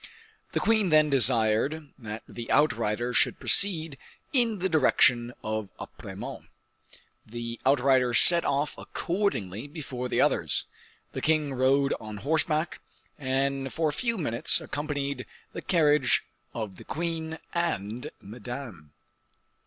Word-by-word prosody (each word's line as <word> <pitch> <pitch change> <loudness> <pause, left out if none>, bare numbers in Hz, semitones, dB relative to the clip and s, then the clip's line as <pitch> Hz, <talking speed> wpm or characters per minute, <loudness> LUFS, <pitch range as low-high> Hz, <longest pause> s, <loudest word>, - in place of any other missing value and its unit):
The - - +1
queen 220 -4 +2
then 155 -1 +4
desired 130 +4 +2
that 110 -2 -7
the 115 -1 -8
outriders 120 -4 +1
should - - +3
proceed 160 -8 +2 0.3
in 235 -5 +2
the 190 0 0
direction 125 -6 +4
of 110 -2 -3
Apremont. - - -8 0.8
The 115 +1 -6
outriders 130 -3 +4
set 170 -1 +5
off 140 +1 0
accordingly 145 - -2
before 135 -5 -6
the - - 0
others. - - +2 0.5
The - - -5
king 155 -3 +1
rode 135 +2 +2
on 110 -1 -7
horseback, 155 +5 0 0.4
and 135 0 -1
for 160 -2 0
a - - -4
few 235 +3 -1
minutes 120 -9 +2
accompanied 140 -3 -4 0.3
the - - -5
carriage 150 -6 +3 0.3
of 105 -5 -5
the - - -11
queen 160 0 -3 0.2
and 125 - -2
Madame. 110 - -9
140 Hz, 120 wpm, -27 LUFS, 120-160 Hz, 0.8 s, set